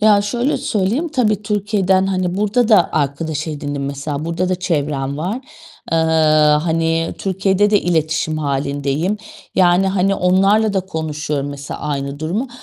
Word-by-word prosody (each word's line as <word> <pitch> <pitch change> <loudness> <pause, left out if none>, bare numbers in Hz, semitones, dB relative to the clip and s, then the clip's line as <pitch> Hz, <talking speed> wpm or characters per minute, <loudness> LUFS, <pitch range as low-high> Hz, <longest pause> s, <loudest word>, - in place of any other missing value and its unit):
Ya, 210 -1 +5
şöyle 240 +7 0
söyleyeyim, 220 - -1
tabii 215 -8 0
Türkiye'den, 200 -2 +1
hani, 185 -2 -1
burada 210 +3 +1
da 205 -7 +5
arkadaş 150 +2 -2
edindim, 145 -2 -4
mesela, 140 +2 -4
burada 170 +2 -1
da 185 - +1
çevrem 145 -6 -2
var. 190 +10 -3 0.5
Eee, - - +3 0.7
hani, 165 0 0
Türkiye'de 195 +1 +1
de 205 - +4
iletişim 160 -2 0
hâlindeyim, 145 +5 -1 0.4
yani, 180 +1 +4
hani, 195 +1 +1
onlarla 195 +4 +3
da 195 - +1
konuşuyorum, 155 -5 -3
mesela, 140 0 -7
aynı 140 0 -4
durumu 200 +12 -2
180 Hz, 140 wpm, -18 LUFS, 150-200 Hz, 0.7 s, Ya